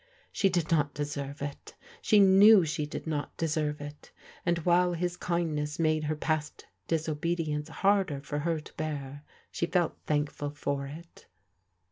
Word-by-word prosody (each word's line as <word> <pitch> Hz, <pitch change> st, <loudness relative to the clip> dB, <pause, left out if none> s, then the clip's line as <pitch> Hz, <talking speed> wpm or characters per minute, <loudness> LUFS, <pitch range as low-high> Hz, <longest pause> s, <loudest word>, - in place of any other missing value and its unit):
She 195 Hz, -, +2 dB
d:d 170 Hz, -3 st, +1 dB
not 145 Hz, -2 st, 0 dB
deserve 145 Hz, -1 st, -4 dB
iL 145 Hz, -, -1 dB, 0.5 s
She 215 Hz, -, +4 dB
knew 195 Hz, 0 st, +7 dB
she 150 Hz, -1 st, -2 dB
did -, -, -6 dB
not 150 Hz, -3 st, -3 dB
deserve 150 Hz, -2 st, -1 dB
it, 145 Hz, 0 st, -10 dB, 0.3 s
and 175 Hz, -1 st, +1 dB
while 180 Hz, 0 st, +4 dB
his 175 Hz, +1 st, -2 dB
kindness 155 Hz, -4 st, -2 dB
made 155 Hz, -1 st, +1 dB
her 155 Hz, +1 st, -1 dB
past 150 Hz, -1 st, -2 dB, 0.2 s
disobedience 160 Hz, -1 st, -1 dB
harder 195 Hz, -4 st, +1 dB
for 145 Hz, +1 st, -4 dB
her 165 Hz, +1 st, 0 dB
to 150 Hz, -, -13 dB
bear, 145 Hz, -2 st, -5 dB, 0.3 s
she 170 Hz, -, -1 dB
felt 175 Hz, -2 st, +1 dB
thankful 145 Hz, -1 st, -1 dB
for 140 Hz, -1 st, -3 dB
it. 165 Hz, +4 st, -12 dB
155 Hz, 150 wpm, -29 LUFS, 145-170 Hz, 0.5 s, knew